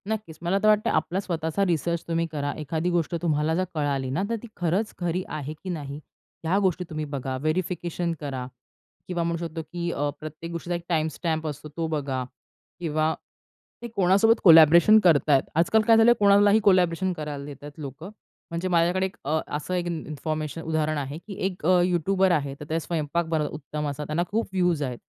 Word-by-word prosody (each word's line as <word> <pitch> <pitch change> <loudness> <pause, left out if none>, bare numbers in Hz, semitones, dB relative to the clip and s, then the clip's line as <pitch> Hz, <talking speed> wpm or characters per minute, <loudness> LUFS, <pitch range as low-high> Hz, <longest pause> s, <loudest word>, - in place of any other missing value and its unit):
नक्कीच. 210 -7 -4
मला 175 +3 +1
तर - - +4
वाटतंय 215 0 +4
आपला 160 +4 0
स्वतःचा 170 0 -1
रिसर्च 170 -1 0
तुम्ही 165 0 0
करा. 145 -2 -2
एखादी 160 +3 -2
गोष्ट 170 -1 0
तुम्हाला 155 -1 +1
जर 185 - +1
कळाली 140 -3 -1
ना 160 +9 -1
तर 230 - 0
"ती - - -7
खरंच 180 +5 0
खरी 175 +1 -1
आहे 150 0 -5
की 190 - -5
नाही?" 145 -4 -5 0.4
ह्या 170 +4 +1
गोष्टी 185 -2 +1
तुम्ही 155 -1 -3
बघा. 135 -2 -4
व्हेरिफिकेशन 170 +2 -2
करा 135 -4 -4 0.6
किंवा 175 -2 -1
म्हणू 170 0 -1
शकतो 165 0 -6
की 170 +2 -4
अ, 145 -1 -1
प्रत्येक 155 +2 -8
गोष्टीचा 170 +1 -3
एक 170 - -5
टाईमस्टॅम्प 160 0 -1
असतो, 150 0 -6
तो 165 -1 -1
बघा. 140 -5 -2 0.6
किंवा 155 -1 0 0.7
ते 240 - -5
कोणासोबत 200 +2 +3
कोलॅबोरेशन 170 +4 +8
करतायेत. 150 -6 +4
आजकाल 175 +7 +3
काय 225 - +7
झालं 225 +1 +6
आहे - - +6
कोणालाही 205 +1 +5
कोलॅबोरेशन 185 -2 +3
करायला 150 -4 -5
देतायत 145 0 -9
लोकं. 150 +5 -8 0.4
म्हणजे 170 +2 -2
माझ्याकडे 175 +2 +2
एक 190 - -10
अ, 155 +3 +1 0.2
असं 155 +5 -4
एक 175 -1 -1
इन 170 -2 -3
इन्फॉर्मेशन 155 0 -4
उदाहरण 155 -1 -1
आहे 140 +2 -4
की 205 - -7
एक 185 -4 -5
अ, 180 0 +5
यूट्यूबर 185 +2 +2
आहे. 140 -4 0
तर - - -6
त्या 160 +1 0
स्वयंपाक 165 0 -2
बनवतात 155 -2 -1
उत्तम 150 0 -4
असा. 145 +1 -4
त्यांना 155 +3 -1
खूप 225 +2 -1
व्यूज 180 -5 +1
आहेत. 125 -3 -3
165 Hz, 190 wpm, -25 LUFS, 150-180 Hz, 0.7 s, कोलॅबोरेशन